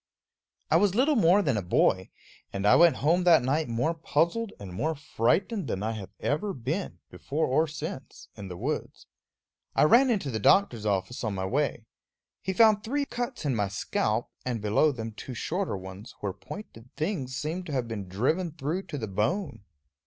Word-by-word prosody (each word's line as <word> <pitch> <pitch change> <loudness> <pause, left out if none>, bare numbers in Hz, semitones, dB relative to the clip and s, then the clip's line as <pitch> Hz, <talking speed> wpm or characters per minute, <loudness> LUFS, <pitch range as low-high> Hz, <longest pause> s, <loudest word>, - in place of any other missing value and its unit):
I 160 - +6
was 200 +1 +2
little 280 +6 +3
more 200 -2 +5
than 140 - +1
a - - 0
boy; 95 +1 +2 0.4
and 100 0 -3
I 105 - +7
went 170 0 +6
home 175 +4 +4
that 165 -6 +6
night 145 +4 +1
more 120 +8 0
puzzled 170 +6 0
and 95 -3 -8
more 155 - -1
frightened 150 - 0
than 100 -3 -2
I 110 - -1
have 105 -4 -6
ever 190 +8 -1
been, 145 - -3
before 155 +3 -2
or 155 +5 +2
since, 150 -3 -7
in 100 -2 -8
the 90 -1 -7
woods. - - -4 0.7
I - - +5
ran 240 - +6
into 195 - 0
the 110 - -2
doctor's 115 - +3
office 100 +5 -1
on 105 -3 -1
my 95 0 -2
way. 125 0 -1 0.6
He 190 - -2
found 215 +1 +5
three 280 +5 -1
cuts 245 - -4
in 135 -4 +1
my 105 -2 +1
scalp, 105 +3 -1
and 125 -3 -2
below 105 +9 +3
them 115 -4 -5
two 125 +4 -8
shorter 180 - -2
ones, 95 +3 -10
where 100 -2 -3
pointed 125 - -10
things 150 -7 -2
seemed 160 +6 -3
to - - -5
have 125 -3 -1
been 105 -4 -5
driven 150 - 0
through 160 +5 -3
to 145 - -5
the 110 -5 -4
bone. 110 - -2
140 Hz, 190 wpm, -28 LUFS, 110-180 Hz, 0.7 s, I